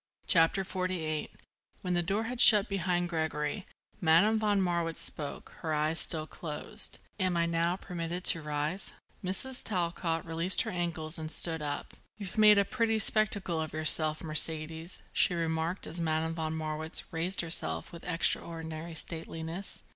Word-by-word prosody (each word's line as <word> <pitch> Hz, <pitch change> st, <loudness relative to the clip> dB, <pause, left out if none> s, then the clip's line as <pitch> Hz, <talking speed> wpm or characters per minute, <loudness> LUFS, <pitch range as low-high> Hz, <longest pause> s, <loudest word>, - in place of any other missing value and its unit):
CHAPTER 170 Hz, +3 st, +3 dB
XLVIII 185 Hz, -5 st, -3 dB, 0.5 s
When 180 Hz, -1 st, -1 dB
the 175 Hz, -, +1 dB
door 200 Hz, +6 st, -1 dB
had 245 Hz, +1 st, -2 dB
shut 210 Hz, -1 st, +9 dB
behind 180 Hz, -2 st, -1 dB
Gregory, 160 Hz, +2 st, -3 dB, 0.3 s
Madame 180 Hz, +7 st, +4 dB
von 210 Hz, -2 st, +1 dB
Marwitz 170 Hz, -3 st, -1 dB
spoke, 145 Hz, -2 st, -7 dB
her 160 Hz, -2 st, -2 dB
eyes 155 Hz, +2 st, 0 dB
still 155 Hz, -2 st, 0 dB
closed: 155 Hz, -1 st, -4 dB, 0.2 s
"Am 185 Hz, -2 st, 0 dB
I 170 Hz, -, +2 dB
now 170 Hz, +1 st, 0 dB
permitted 175 Hz, -1 st, -5 dB
to 165 Hz, -, +2 dB
rise?" 150 Hz, +5 st, -4 dB, 0.3 s
Mrs. 220 Hz, +8 st, 0 dB
Talcott 170 Hz, -4 st, -2 dB
released 165 Hz, +3 st, +2 dB
her -, -, -5 dB
ankles 170 Hz, -2 st, -4 dB
and 155 Hz, 0 st, -5 dB
stood 160 Hz, 0 st, -1 dB
up. 145 Hz, -1 st, -5 dB, 0.2 s
"You've 205 Hz, 0 st, -5 dB
made 210 Hz, -1 st, +7 dB
a 200 Hz, -, +3 dB
pretty 230 Hz, 0 st, 0 dB
spectacle 205 Hz, -6 st, +2 dB
of 155 Hz, -2 st, -5 dB
yourself, 155 Hz, 0 st, +5 dB
Mercedes," 160 Hz, +2 st, 0 dB
she 180 Hz, -, +2 dB
remarked 165 Hz, +2 st, -2 dB
as 165 Hz, -, -4 dB
Madame 160 Hz, 0 st, -1 dB
von 160 Hz, -1 st, -3 dB
Marwitz 155 Hz, 0 st, +1 dB
raised 170 Hz, +4 st, 0 dB
herself 80 Hz, -, +3 dB
with 170 Hz, -, -11 dB
extraordinary 165 Hz, -1 st, -2 dB
stateliness. 165 Hz, +3 st, -5 dB
165 Hz, 150 wpm, -30 LUFS, 160-185 Hz, 0.5 s, shut